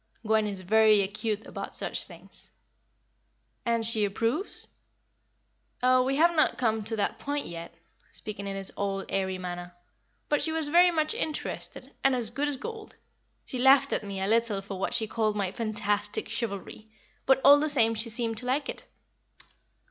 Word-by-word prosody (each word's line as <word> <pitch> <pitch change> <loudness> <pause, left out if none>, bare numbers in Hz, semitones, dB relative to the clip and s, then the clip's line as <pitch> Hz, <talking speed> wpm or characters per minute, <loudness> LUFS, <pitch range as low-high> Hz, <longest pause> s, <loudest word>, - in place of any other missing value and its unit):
Gwen 215 0 +3
is 195 -2 -5
very 215 +2 +5
acute 215 +2 -3
about - - -7
such - - -3
things." - - -12 1.2
"And 230 -1 +1
she 220 -1 +3
approves?" 230 - -1 1.2
"Oh, 255 0 +5
we 265 +2 +1
have 340 +3 +4
not 310 - +3
come 220 -3 +1
to 225 - -1
that 205 - -1
point 285 0 -2
yet" 170 0 -8 0.4
speaking 205 -2 -6
in 195 - -3
his 195 -1 -6
old, 195 -1 -2
airy 190 -1 -1
manner 175 -1 -6 0.5
"but 295 - +1
she 320 - 0
was 320 -2 -2
very 350 +3 +6
much 310 -3 0
interested, 310 -1 -4
and 270 -1 +4
as 235 -3 -2
good 280 +4 -1
as 290 -2 -1
gold. 445 - -8 0.5
She 255 - -4
laughed 265 +1 +5
at - - -1
me 200 -1 -5
a 190 - -1
little 220 -2 +1
for 195 -1 -6
what - - -1
she 220 - +1
called 215 -1 0
my 195 -3 -1
fantastic 210 -1 -1
chivalry; 215 -1 -5 0.4
but, 265 - +5
all 285 +1 +9
the 305 +1 +1
same, 230 -6 +3
she 225 +1 -2
seemed 230 0 -1
to 250 - -7
like 275 +2 0
it." - - -7
225 Hz, 175 wpm, -28 LUFS, 200-270 Hz, 1.2 s, all